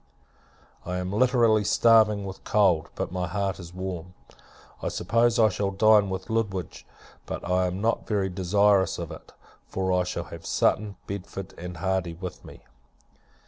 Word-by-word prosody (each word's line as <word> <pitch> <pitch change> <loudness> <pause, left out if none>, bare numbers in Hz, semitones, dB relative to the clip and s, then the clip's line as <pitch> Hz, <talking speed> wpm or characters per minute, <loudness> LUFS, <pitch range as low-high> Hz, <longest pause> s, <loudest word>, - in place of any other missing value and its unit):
I 90 +1 -3
am 90 +1 -3
literally 115 -2 +3
starving 105 -1 +4
with 95 0 -8
cold; 90 -7 +2
but - - -3
my 90 -1 -2
heart 100 -2 -2
is 85 -2 -9
warm. 90 -1 -6 0.7
I - - -2
suppose 115 +5 +1
I 110 -2 +5
shall 100 +1 -1
dine 105 0 +4
with 95 0 -4
Lutwidge: 100 -7 -3 0.4
but - - -5
I 90 0 +2
am 90 +2 -4
not 115 +2 0
very 100 -3 0
desirous 95 +1 +2
of - - -6
it; - - -11 0.4
for 95 -1 -1
I 90 0 +2
shall 90 -1 -4
have 85 0 -10
Sutton, 100 +4 +1
Bedford, 95 0 -7
and 90 0 -7
Hardy, 95 -1 -1
with 90 +1 -8
me. - - -13
95 Hz, 160 wpm, -26 LUFS, 90-105 Hz, 0.7 s, I